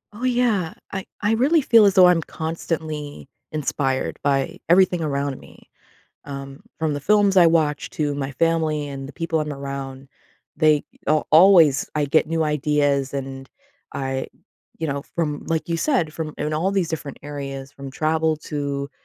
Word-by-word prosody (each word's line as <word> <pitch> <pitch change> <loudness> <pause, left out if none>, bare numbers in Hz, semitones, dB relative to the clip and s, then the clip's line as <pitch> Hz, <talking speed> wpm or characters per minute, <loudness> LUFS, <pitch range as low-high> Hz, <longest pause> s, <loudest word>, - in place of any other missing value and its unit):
Oh, 235 - -9
yeah. 240 -9 +1 0.2
I 190 -1 -4 0.2
I 210 - +1
really 285 +8 +3
feel 230 -5 +6
as 195 - +3
though 185 -2 +8
I'm 175 -2 +4
constantly 155 -3 -5 0.2
inspired 140 -3 -2
by 135 -1 0
everything 180 0 +4
around 140 -3 -2
me, - - -18 0.6
um, 140 0 -8 0.2
from 160 -2 0
the 145 - -4
films 205 +3 +3
I 175 -2 +8
watch 155 -3 +1
to 145 -2 -2
my 140 -1 -4
family 155 0 0
and 135 -1 -7
the - - -10
people 165 -2 -2
I'm 150 -1 -3
around, 135 -1 -7 0.5
they 155 -1 +3 0.2
a 155 +1 +3
always 160 -5 +6
I 150 -1 +1
get 155 +3 +3
new 165 +1 0
ideas 145 -2 0
and 135 -1 -6 0.5
I, 135 -1 -3 0.5
you 160 - -2
know, 140 0 -3
from 150 -3 -2
like 165 0 -2
you 170 - 0
said, 165 - 0
from 155 -1 -5
in 150 +1 -2
all 170 +6 0
these 190 -4 0
different 150 -4 -5
areas, 135 -2 -6
from 140 -1 -9
travel 160 +2 0
to, 140 -1 -3
150 Hz, 165 wpm, -22 LUFS, 140-165 Hz, 0.6 s, though